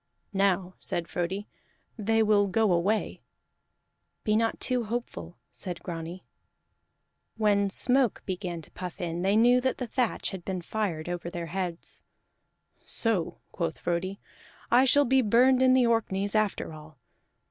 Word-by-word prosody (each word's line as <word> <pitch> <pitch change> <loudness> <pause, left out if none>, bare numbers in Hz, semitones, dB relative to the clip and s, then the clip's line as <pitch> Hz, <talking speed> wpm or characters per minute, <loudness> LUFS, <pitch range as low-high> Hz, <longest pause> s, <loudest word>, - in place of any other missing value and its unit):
"Now," 190 -2 +1
said 170 -1 -2
Frodi, 190 +4 -3 0.5
"they 225 0 +2
will 205 -1 +4
go 215 +1 +2
away." 195 +6 0 1.0
"Be 215 - +2
not 225 +1 +1
too 250 -2 +1
hopeful," 210 - -5
said 180 -3 -5
Grani. 170 +1 -6 1.1
When 205 -2 +2
smoke 250 +3 +2
began 180 -3 -4
to - - -15
puff 180 0 -7
in, 170 -1 -3
they 195 +2 +2
knew 245 +3 +5
that 260 0 0
the 250 - -3
thatch 245 0 -1
had 190 -3 -7
been 185 -2 -4
fired 175 -6 -2
over 175 -1 -4
their 170 -1 -5
heads. 180 -3 -4 0.8
"So," 220 -8 -1
quoth 165 -3 -3
Frodi, 175 +3 -2 0.5
"I 250 +2 +6
shall 285 +2 +5
be 265 +2 +4
burned 250 +3 +4
in 260 0 +6
the 255 -1 +5
Orkneys 205 -4 0
after 215 -6 0
all. 155 -1 -13
200 Hz, 145 wpm, -28 LUFS, 175-225 Hz, 1.1 s, I